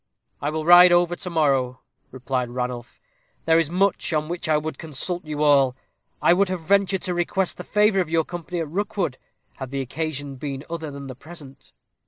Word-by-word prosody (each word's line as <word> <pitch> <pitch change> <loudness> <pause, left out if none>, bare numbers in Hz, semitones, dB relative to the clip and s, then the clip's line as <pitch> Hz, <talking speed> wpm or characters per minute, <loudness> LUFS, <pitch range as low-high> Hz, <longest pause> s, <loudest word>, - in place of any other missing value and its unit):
"I 145 - -1
will 155 0 -3
ride 175 +1 +9
over 175 0 +3
to 180 - -6
morrow," 135 -6 +1 0.3
replied 125 -1 -3
Ranulph; 125 -1 -5 0.5
"there 165 0 +4
is 165 -3 0
much 190 +2 +1
on 155 0 -1
which 175 -2 -4
I 155 - +4
would 155 +1 -5
consult 165 +3 -4
you 150 -1 -2
all. 140 -4 +4 0.5
I - - +6
would 190 +1 +2
have 185 -2 -3
ventured 195 +2 +1
to 180 - -1
request 175 +2 0
the - - -7
favor 210 -1 +2
of 175 -4 -1
your 165 -1 +1
company 175 0 -6
at 160 - -3
Rookwood, 180 -4 -2 0.4
had 130 -2 -6
the 135 +1 -3
occasion 145 +1 -4
been 140 0 -5
other 160 -2 -4
than 140 -1 -8
the 130 - -7
present." 140 -1 -13
155 Hz, 195 wpm, -23 LUFS, 135-175 Hz, 0.5 s, ride